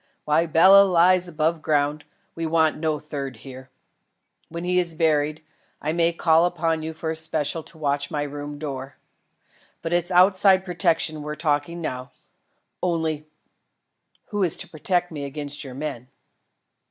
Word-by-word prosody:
While 155 +3 +2
Bela 185 +5 +7
lies 180 -1 +3
above 160 0 -1
ground, 145 0 0 0.3
we 165 -1 -3
want 160 -1 +2
no 155 -1 -1
third 140 -3 -6
here. 130 -1 -10 0.8
When 170 +1 -6
he 180 0 +1
is 170 -2 -2
buried, 155 -1 +1 0.4
I 155 +2 -2
may 170 0 +2
call 165 0 +3
upon 165 -2 -1
you 160 +1 -4
for 160 0 -4
a - - -3
special 160 0 -2
to 160 - -15
watch 145 -2 -1
my 150 -3 -2
room 145 0 -6
door. 135 -2 -6 0.9
But 165 - -2
it's 175 0 +1
of 180 - +1
outside 190 0 +5
protection 165 -3 0
we're 150 +1 -5
talking 150 +2 -1
now. 130 -5 -5 0.7
Only, 160 -3 -1 1.0
who 205 -1 -2
is 175 -4 +5
to - - -6
protect 175 +3 -1
me 150 -3 -6
against 145 +1 -4
your 130 -3 -9
men?" 135 -4 -5
160 Hz, 155 wpm, -23 LUFS, 145-170 Hz, 1.0 s, Bela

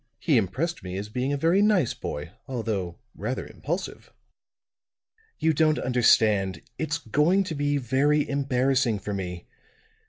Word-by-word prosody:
He 145 +5 +1
impressed 140 - -1
me 90 0 -5
as 100 +2 -5
being 125 +5 -2
a 145 - 0
very 165 +7 +3
nice 205 - +3
boy, 75 +3 -6 0.2
although 105 -9 -3 0.2
rather 120 +6 -4
impulsive." 175 +6 -5 1.3
"You 160 0 +2
don't 155 0 +3
understand. 110 -7 +3 0.2
It's 155 -1 -1
going 155 - +2
to 180 - -5
be 145 -1 0
very 140 +4 +2
embarrassing 135 -4 +1
for 100 +1 -5
me. 90 -3 -5
Mr. 445 0 -35
135 Hz, 145 wpm, -26 LUFS, 105-160 Hz, 1.3 s, very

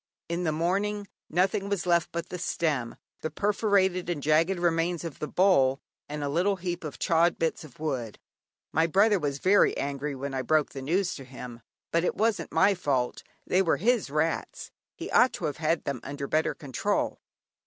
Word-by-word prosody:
In 170 +1 -2
the 160 - +2
morning 200 +6 -1 0.2
nothing 190 +3 +1
was 200 -3 -1
left 170 -1 +2
but 170 0 -4
the 180 - -5
stem, 150 -8 -1 0.3
the 155 - -2
perforated 195 -3 +1
and 155 -5 -2
jagged 160 +5 +3
remains 170 0 +1
of 165 -5 -7
the 150 - -3
bowl, 140 -9 +3 0.3
and 150 0 -4
a - - -1
little 180 +8 +1
heap 175 -2 -4
of 155 -3 -6
chawed 170 +1 +2
bits 165 0 -1
of 150 -3 -14
wood. 130 -8 -3 0.6
My 160 +2 +3
brother 200 +4 +4
was 145 -3 -2
very 190 +7 +4
angry 140 +1 -3
when 135 +1 -5
I 130 - -1
broke 155 +3 +2
the 135 - -7
news 180 +7 0
to 135 - -9
him, 125 -2 -9 0.3
but 170 0 +2
it - - 0
wasn't 220 +1 0
my 200 - +4
fault, 140 -9 -1 0.2
they 185 - +3
were 170 -4 +2
his 230 - +1
rats; 155 +3 -2 0.2
he - - -7
ought 255 - +5
to 170 - -4
have 145 -3 -2
had 160 +1 0
them 140 -3 -3
under 140 0 -5
better 155 +3 0
control. 140 -6 -2
165 Hz, 190 wpm, -28 LUFS, 145-185 Hz, 0.6 s, ought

